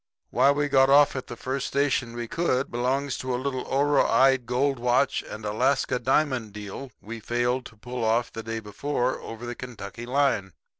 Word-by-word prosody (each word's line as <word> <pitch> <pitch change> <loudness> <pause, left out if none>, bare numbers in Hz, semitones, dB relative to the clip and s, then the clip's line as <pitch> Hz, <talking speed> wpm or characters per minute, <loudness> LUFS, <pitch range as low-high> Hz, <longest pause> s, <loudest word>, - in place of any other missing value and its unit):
Why 130 +3 +4
we 145 +1 +2
got 135 -1 +4
off 145 +1 +6
at 130 - -5
the 120 - -7
first 130 +3 -3
station 135 -4 0
we 120 -1 -4
could, 140 -3 0
belongs 130 +3 -1
to 130 -1 -2
a - - -1
little 130 0 -2
oroide 135 -2 +3
gold 135 +2 +1
watch 125 +3 +2
and 110 0 -9
Alaska 125 +4 +1
diamond 130 -6 +1
deal 105 +6 -7
we 115 +2 -7
failed 120 +3 -1
to 115 - -19
pull 125 +2 -5
off 115 +2 +1
the 115 - -5
day 115 0 -4
before, 125 +4 -2
over 115 +1 -8
the 120 - -4
Kentucky 120 -2 -8
line. 125 -8 +1
125 Hz, 185 wpm, -26 LUFS, 115-135 Hz, -, off